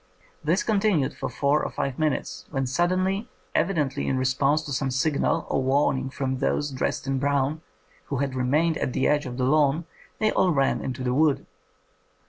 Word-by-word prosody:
This 165 +6 +2
continued 200 - +1
for - - -4
four 145 +1 +1
or - - -2
five 135 0 -3
minutes, 155 -2 -1
when 135 -1 -1
suddenly, 185 - 0 0.2
evidently 150 -9 0
in 130 - +1
re 130 - 0
sponse 140 +4 +2
to 145 - -6
some 135 +1 0
signal 140 +3 +1
or - - 0
warning 135 0 +1
from 130 -1 -3
those 145 +1 0
dressed 130 - -2
in 135 -1 0
brown, 140 +2 0 0.4
who 140 - -3
had 135 0 -1
remained 150 +6 +1
at 125 - -1
the - - +1
edge 150 -2 +1
of 125 -1 -6
the 130 - +1
lawn, 150 +3 +3 0.3
they 215 0 +2
all 185 - +3
ran 135 -3 +1
into 130 0 -4
the 125 -1 0
wood. 150 +1 +2
140 Hz, 185 wpm, -25 LUFS, 130-155 Hz, 0.4 s, lawn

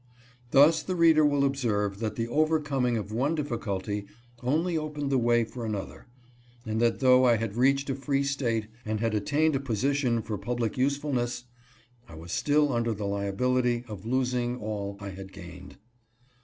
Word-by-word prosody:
Thus 150 +4 +6
the 185 +4 -3
reader 165 -2 +5
will 145 -1 +3
observe 105 -8 -1
that 110 -2 -3
the 115 0 -2
overcoming 145 -3 +1
of 105 -1 -5
one 135 +8 0
difficulty 105 -8 -3 0.3
only 160 +7 0
opened 150 -2 -3
the 135 - +3
way 120 0 +3
for 120 +2 -7
another, 105 +1 -5 0.6
and 110 0 -1
that 120 +2 +1
though 130 -1 +6
I 120 -2 +5
had 110 -2 -3
reached 135 +3 +2
a - - 0
free 135 +1 -1
State, 125 -6 -1 0.2
and 110 0 -2
had 115 0 0
attained 145 +9 +1
a - - +1
position 130 -1 0
for 105 -2 -4
public 120 -3 -2
usefulness, 130 -3 -1 0.7
I 80 - -11
was 80 +2 -9
still 145 -1 +2
under 115 -1 0
the 100 0 -4
liability 120 +5 0
of 105 -3 -8
losing 125 -1 0
all 100 -3 -4
I 100 -1 -6
had 95 0 -9
gained. 90 -2 -11
120 Hz, 170 wpm, -28 LUFS, 110-140 Hz, 0.7 s, Thus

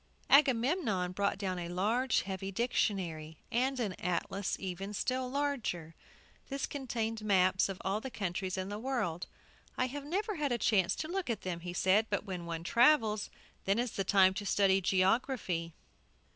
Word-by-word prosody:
Agamemnon 255 - +3
brought 200 +1 0
down 185 -2 -2
a 170 -1 -5
large 220 +8 +1
heavy 195 0 -4
dictionary, 180 -8 -1
and 260 +3 +1
an 210 -6 -1
atlas 180 +2 -1 0.4
still 255 +4 -1
larger. 250 - -2 0.6
This 275 -1 -2
contained 225 -5 -3
maps 185 -2 +3
of 195 - -5
all 195 +3 0
the 265 - -5
countries 190 -3 -3
in 190 +1 -3
the 205 +1 -4
world. 225 -10 -2 0.5
"I 255 - +2
have 280 +3 -5
never 395 +7 -2
had 290 -3 0
a 240 - +2
chance 195 -5 +2
to 310 - -4
look 365 -2 -3
at 230 - -1
them," 180 -2 -4
he 175 +1 -6
said; 195 +5 +3
"but 205 0 -1
when 180 -4 -5
one 165 -1 -4
travels, 225 - +3 0.4
then 195 +2 +2
is 240 -1 0
the 195 - -2
time 190 -1 +5
to 200 - -4
study 195 -1 +3
geography." 185 -2 +1
205 Hz, 165 wpm, -32 LUFS, 185-255 Hz, 0.6 s, time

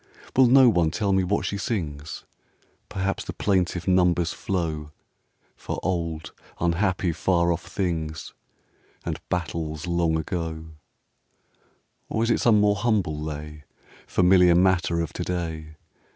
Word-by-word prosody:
Will 130 -1 +6
no 130 +1 +7
one 90 -8 +3
tell 100 +4 0
me 95 0 +3
what 100 +3 0
she 100 - -2
sings? 80 - -4 0.6
Perhaps 100 -1 -2
the - - -5
plaintive 90 -3 0
numbers 90 -2 +3
flow 80 -5 -3 0.7
For - - -5
old, 85 -4 -2 0.3
unhappy, 90 +1 +1
far 85 +1 +1
off 85 - -5
things, 80 -5 -3 0.7
And - - -3
battles 80 -2 -3
long 85 -2 +1
ago: 80 -1 -4 1.4
Or 110 - 0
is 115 - +1
it - - +2
some 110 -3 +5
more 105 0 +3
humble 100 -8 0
lay, 75 0 -6 0.4
Familiar 90 -1 +5
matter 90 -2 +2
of 80 - -4
to - - -3
day? 80 -3 -4
85 Hz, 130 wpm, -25 LUFS, 80-95 Hz, 1.4 s, no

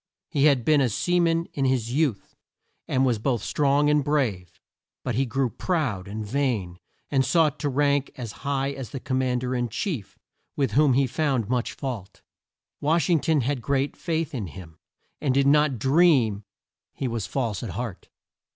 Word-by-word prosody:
He 145 -1 +2
had 140 -6 +3
been 150 -2 +4
a 130 - +2
sea 175 - +1
man 165 -1 +2
in 135 - 0
his 125 -3 0
youth, 140 -8 -1 0.5
and 130 +1 +2
was 120 -4 +1
both 120 -2 -1
strong 145 0 +2
and 150 -1 +3
brave. 105 - -1 0.4
But 125 - -2
he 130 +4 +1
grew 130 0 0
proud 120 - -2
and 105 +2 -5
vain, 105 -8 -1 0.3
and 135 -2 +3
sought 150 +2 +2
to 145 - -1
rank 140 0 +1
as 120 -4 -5
high 140 -1 -1
as 135 -4 -7
the 135 - -6
Com 130 +1 -1
mand 125 -1 0
er 125 0 -1
in 120 -1 -1
chief, 125 - -4 0.4
with 135 -2 0
whom 145 -2 +4
he 135 +2 +3
found 130 -5 -1
much 125 -1 -1
fault. 120 -9 -6 0.6
Wash 160 +2 +1
ing 165 - +4
ton 155 -1 +2
had 130 +1 -1
great 140 +2 0
faith 165 -3 -2
in 110 -8 -3
him, 80 -1 -11 0.4
and 135 -4 +1
did 140 0 +3
not 145 -2 +4
dream 130 - +3 0.5
he 135 - -2
was 115 -4 -3
false 115 -8 -2
at 115 - -5
heart. 105 +1 -6
135 Hz, 185 wpm, -25 LUFS, 115-145 Hz, 0.6 s, been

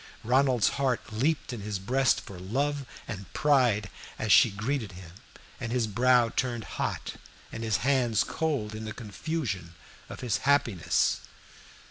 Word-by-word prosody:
Ronald's 125 -2 +3
heart 125 -4 -1
leaped 140 +4 0
in 115 - -5
his 105 0 -3
breast 130 +7 +2
for 95 -3 -10
love 140 +8 -1 0.2
and 100 -2 -7
pride 125 -9 +3 0.3
as 110 -1 -1
she 120 - +8
greeted 110 +1 -3
him, 90 -2 -11 0.5
and 120 -2 -4
his 120 -2 +1
brow 120 +2 +4
turned 120 -1 -2
hot - - -4 0.3
and 115 - -5
his 110 -3 +1
hands 125 -6 +3
cold 140 -10 -2
in 110 0 -6
the 110 - -5
confusion 105 - -4 0.3
of - - -8
his 115 -6 0
happiness. 120 -8 +2
115 Hz, 145 wpm, -28 LUFS, 105-135 Hz, 0.5 s, she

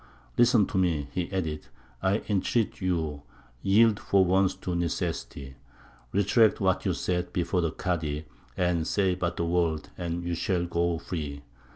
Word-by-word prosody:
"Listen 120 -3 +5
to 95 - -1
me," 80 -6 0
he 90 0 -3
added, 80 -6 -3 0.3
"I 95 +3 +1
entreat 105 +2 0
you; 80 -6 -1 0.4
yield 105 +2 +4
for 95 -1 +3
once 95 +1 +3
to 90 - -4
necessity; 70 -5 -3 0.5
retract 105 +3 +4
what 95 -2 +1
you - - +2
said 90 -1 -2
before 90 +1 0
the 85 -2 0
Kādy; 80 -4 -2 0.6
say 95 -3 +2
but 85 -1 -2
the 85 - 0
word, 85 -3 0
and 85 0 -3
you 85 0 -2
shall 85 +1 0
go 85 0 0
free." 75 -4 -5
90 Hz, 150 wpm, -28 LUFS, 85-95 Hz, 0.6 s, Listen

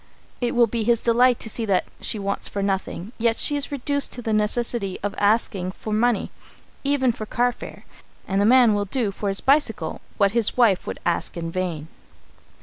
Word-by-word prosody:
It 245 0 -1
will 240 0 +6
be 230 0 -2
his 235 +1 +2
delight 240 +1 +3
to - - -5
see 225 +1 -1
that 190 -2 +2 0.2
she - - 0
wants 200 0 -2
for 200 - -3
nothing, 195 0 -3
yet 230 0 +2
she 290 - +4
is 285 0 -2
reduced 285 +1 -1
to 245 - -7
the 220 - -1
necessity 215 -1 0
of 205 -1 -2
asking 200 -3 +1
for 215 - -6
money 230 0 +1 0.5
even 275 -3 +2
for 215 -1 -7
carfare 245 +2 -2 0.4
and 195 +1 +1
a - - +3
man 245 -1 +6
will 205 0 0
do 215 0 -1
for 200 +1 -5
his 195 0 -2
bicycle 270 -6 +1 0.2
what 200 -1 +3
his 230 0 0
wife 220 -7 +3
would - - -5
ask 170 0 -1
in 165 -1 -4
vain. 170 -4 -3
220 Hz, 195 wpm, -23 LUFS, 200-240 Hz, 0.5 s, will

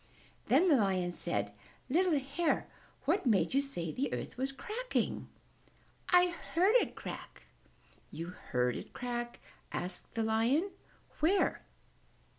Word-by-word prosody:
Then 370 - +5
the 300 -6 +6
Lion 190 -5 +1
said, 100 -11 -2 0.3
"Little 340 +2 +3
Hare, 280 +5 0 0.4
what 330 +2 +2
made 195 -5 +3
you 275 - +4
say 175 - -4
the 270 - -1
earth - - -4
was 265 +2 -1
cracking?" 440 - -2 0.8
"I 360 0 +6 0.3
heard 375 +6 +5
it - - 0
crack." - - -8 0.7
"You 165 +2 -5
heard 125 -8 -1
it - - -7
crack?" 240 -1 -3 0.3
said 180 +1 -4
the 225 - +1
Lion. 235 - +2 0.5
"Where?" 360 +6 +3
260 Hz, 125 wpm, -33 LUFS, -, 0.8 s, the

